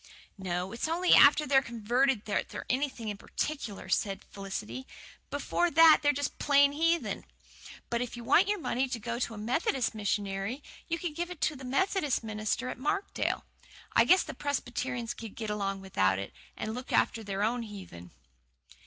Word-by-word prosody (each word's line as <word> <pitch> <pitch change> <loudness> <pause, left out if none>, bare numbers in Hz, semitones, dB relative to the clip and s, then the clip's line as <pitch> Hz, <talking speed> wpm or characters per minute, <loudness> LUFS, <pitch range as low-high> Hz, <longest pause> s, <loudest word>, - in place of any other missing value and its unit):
"No, 180 0 -2
it's 235 +6 -3
only 345 +3 +3
after 300 +2 +7
they're 270 -1 +4
converted 235 0 0
that 210 - -1
they're - - -7
anything 255 -4 -1
in 205 - -4
particular," 230 -5 -4
said 195 +1 0
Felicity. 205 +6 -6 0.4
"Before 290 +4 0
that, 325 0 +7
they're 290 -1 +4
just 285 0 -3
plain 285 -1 +5
heathen. 330 +3 0 0.7
But 235 0 0
if 245 -1 -4
you 240 - -7
want 355 +11 +5
your 415 0 +1
money 270 -6 -1
to 250 -2 -3
go 235 +2 -4
to 235 -3 -2
a - - -9
Methodist 245 +3 0
missionary 205 +4 -2 0.2
you 335 - -1
can 335 -2 -4
give 345 +3 -3
it 360 -3 -8
to 305 - +1
the 265 - -10
Methodist 295 0 0
minister 215 +3 -2
at - - -6
Markdale. 395 +9 -1 0.5
I - - +6
guess 370 +1 +5
the - - -7
Presbyterians 250 -4 -3
can 225 -3 -9
get 220 -2 -4
along 195 -2 -2
without 95 - +1
it, 95 0 -6 0.2
and 215 0 -3
look 250 +2 -7
after 225 - +2
their 200 0 -2
own 235 +3 +1
heathen." 190 - -9
245 Hz, 180 wpm, -30 LUFS, 210-290 Hz, 0.7 s, after